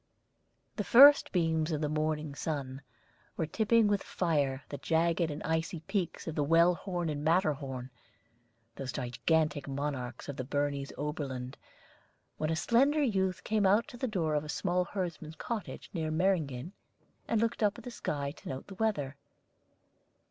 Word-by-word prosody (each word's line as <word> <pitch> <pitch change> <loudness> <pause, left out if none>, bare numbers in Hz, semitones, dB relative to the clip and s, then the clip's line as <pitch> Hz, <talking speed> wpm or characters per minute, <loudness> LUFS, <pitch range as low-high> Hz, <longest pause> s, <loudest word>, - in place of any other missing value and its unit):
_ - - -44
The 210 - 0
first 280 +7 +8
beams 165 -2 +1
of 155 - 0
the 150 - 0
morning 155 -1 -1
sun 140 -3 -4 0.6
were 160 - 0
tipping 220 +5 +3
with 205 -1 +1
fire 145 -6 0
the 145 - -6
jagged 165 +2 +1
and 150 0 -5
icy 160 0 -1
peaks 185 0 -3
of 160 - -2
the 150 - 0
Wellhorn 175 +3 +2
and 150 -1 -3
Matterhorn, 145 -7 0 0.9
those 135 -1 -4
gigantic 145 +4 0
monarchs 135 -3 -4
of 140 - -6
the 130 - -2
Bernese 145 0 -2
Oberland, 135 -4 -4 0.8
when 155 - 0
a 165 - +1
slender 270 - +3
youth 190 -7 0
came 215 -2 +2
out 210 +7 +3
to 245 - -10
the 260 - -1
door 170 -8 -1
of 150 0 +1
a 155 - -9
small 180 +3 0
herdsman's 170 -5 -5
cottage 225 +2 -5
near 160 -3 -2
Meyringen, 160 -4 0 0.6
and 225 - +1
looked 230 +1 0
up 210 -1 +2
at - - -10
the 245 - -7
sky 140 -10 -3
to - - -9
note 130 0 -5
the 195 - -10
weather. 145 -11 0
160 Hz, 165 wpm, -31 LUFS, 145-190 Hz, 0.9 s, first